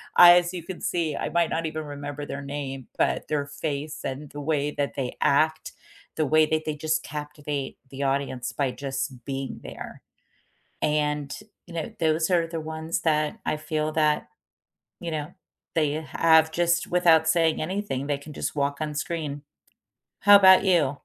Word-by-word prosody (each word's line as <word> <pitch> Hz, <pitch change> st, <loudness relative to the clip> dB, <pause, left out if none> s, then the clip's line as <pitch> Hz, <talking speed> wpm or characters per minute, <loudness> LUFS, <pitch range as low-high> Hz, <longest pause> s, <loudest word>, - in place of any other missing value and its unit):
I 175 Hz, 0 st, +10 dB
as 175 Hz, +1 st, 0 dB
you 175 Hz, -3 st, -5 dB
can 180 Hz, +1 st, -7 dB
see, 160 Hz, -4 st, -1 dB
I -, -, -2 dB
might 170 Hz, -1 st, +2 dB
not 165 Hz, 0 st, -1 dB
even 155 Hz, 0 st, -3 dB
remember 145 Hz, 0 st, -6 dB
their 140 Hz, 0 st, -6 dB
name, 140 Hz, -2 st, -5 dB
but -, -, +1 dB
their 145 Hz, -2 st, -1 dB
face 150 Hz, +1 st, -4 dB
and 140 Hz, +2 st, -5 dB
the 145 Hz, -, -8 dB
way 145 Hz, -1 st, 0 dB
that 145 Hz, -1 st, -2 dB
they 130 Hz, -3 st, -3 dB
act, 155 Hz, +3 st, +2 dB, 0.4 s
the 155 Hz, -3 st, 0 dB
way 155 Hz, +1 st, +5 dB
that 155 Hz, 0 st, 0 dB
they 155 Hz, -, -2 dB
just 155 Hz, +1 st, -1 dB
captivate 150 Hz, -1 st, -5 dB
the 140 Hz, +1 st, -5 dB
audience 135 Hz, -2 st, -1 dB
by 135 Hz, -3 st, 0 dB
just 135 Hz, -2 st, -5 dB
being 135 Hz, -1 st, -4 dB
there. -, -, -9 dB, 0.8 s
And, 150 Hz, -1 st, 0 dB, 0.3 s
you 175 Hz, -, -11 dB
know, 170 Hz, +7 st, -4 dB
those 160 Hz, +1 st, +1 dB
are 170 Hz, -2 st, +3 dB
the 165 Hz, -1 st, -5 dB
ones 160 Hz, +1 st, -3 dB
that 155 Hz, -2 st, +1 dB
I 155 Hz, -, +1 dB
feel 155 Hz, 0 st, -2 dB
that, 155 Hz, -1 st, +1 dB, 0.7 s
you 170 Hz, -2 st, -5 dB
know, 150 Hz, -1 st, -4 dB, 0.4 s
they 150 Hz, -3 st, +1 dB
have 160 Hz, +1 st, +3 dB
just 170 Hz, +1 st, +1 dB
without 165 Hz, -3 st, +4 dB
saying 160 Hz, -1 st, +3 dB
anything, 165 Hz, -6 st, -3 dB
they 145 Hz, -1 st, 0 dB
can 150 Hz, +1 st, -11 dB
just -, -, -3 dB
walk 140 Hz, 0 st, 0 dB
on 150 Hz, -1 st, -2 dB
screen. 150 Hz, -2 st, -3 dB, 0.8 s
How 205 Hz, 0 st, +9 dB
about 190 Hz, -1 st, +8 dB
you? 155 Hz, -7 st, +3 dB
155 Hz, 175 wpm, -26 LUFS, 145-160 Hz, 0.8 s, I